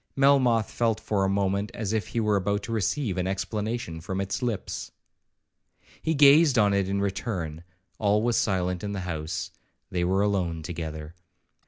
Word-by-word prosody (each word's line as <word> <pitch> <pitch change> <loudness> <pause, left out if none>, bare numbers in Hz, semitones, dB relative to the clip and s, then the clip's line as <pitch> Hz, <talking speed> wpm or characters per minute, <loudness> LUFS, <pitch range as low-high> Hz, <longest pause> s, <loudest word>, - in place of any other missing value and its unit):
Melmoth 130 -6 +4
felt 115 -2 +1
for 100 -2 0
a 95 - +2
moment 100 +1 0
as 110 -2 -2
if 110 -1 -1
he 115 - -2
were 105 -2 +2
about 100 +1 0
to - - -6
receive 110 -1 -1
an 90 - -1
explanation 105 -2 -3
from 95 +3 -4
its 100 +7 -2
lips. 120 -5 -3 1.1
He 160 0 0
gazed 145 0 +6
on 105 -2 +4
it 100 -1 +1
in 100 0 0
return,—all 95 +1 -2
was 120 0 +2
silent 90 -3 0
in 100 0 -3
the 100 - -3
house,—they 85 +1 -5
were 95 +3 +2
alone 90 -6 -1
together. 80 -2 -6
100 Hz, 160 wpm, -26 LUFS, 90-110 Hz, 1.1 s, gazed